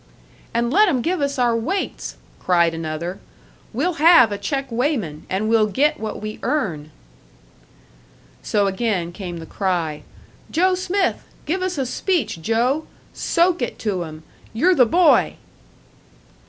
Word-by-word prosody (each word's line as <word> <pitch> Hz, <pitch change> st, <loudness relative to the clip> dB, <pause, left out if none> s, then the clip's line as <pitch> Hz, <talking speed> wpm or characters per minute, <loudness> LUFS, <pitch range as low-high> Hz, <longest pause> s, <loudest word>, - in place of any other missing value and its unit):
"And 235 Hz, +2 st, 0 dB
let 420 Hz, +2 st, +5 dB
'em 255 Hz, -7 st, 0 dB
give 350 Hz, -1 st, 0 dB
us 280 Hz, 0 st, -1 dB
our 240 Hz, -2 st, +2 dB
weights!" 335 Hz, -, -3 dB, 0.2 s
cried 170 Hz, -2 st, +2 dB
another. 165 Hz, +3 st, -4 dB, 0.5 s
"We'll 320 Hz, +9 st, -1 dB
have 320 Hz, -9 st, +7 dB
a 205 Hz, -, -2 dB
check 270 Hz, +7 st, -2 dB
weighman, 230 Hz, -, -2 dB
and 195 Hz, +3 st, -1 dB
we'll 220 Hz, -1 st, +3 dB
get 295 Hz, +8 st, +1 dB
what 215 Hz, -1 st, -4 dB
we 215 Hz, 0 st, -6 dB
earn!" 195 Hz, -, -2 dB, 1.5 s
So 205 Hz, -1 st, +1 dB
again 195 Hz, -3 st, -1 dB
came 175 Hz, -1 st, -6 dB
the 165 Hz, -, -8 dB
cry, 170 Hz, -5 st, -2 dB, 0.5 s
"Joe 370 Hz, +3 st, +2 dB
Smith! 370 Hz, +1 st, 0 dB, 0.2 s
Give 365 Hz, +5 st, -1 dB
us 370 Hz, -3 st, -2 dB
a 270 Hz, -, 0 dB
speech, 255 Hz, -, -1 dB
Joe! 245 Hz, -, 0 dB, 0.3 s
Soak 340 Hz, -2 st, +1 dB
it 245 Hz, -, -3 dB
to 190 Hz, -4 st, 0 dB
'em! 155 Hz, -1 st, -9 dB, 0.3 s
You're 335 Hz, +12 st, +3 dB
the 250 Hz, -7 st, +5 dB
boy!" 340 Hz, +6 st, +4 dB
235 Hz, 140 wpm, -21 LUFS, 185-315 Hz, 1.5 s, have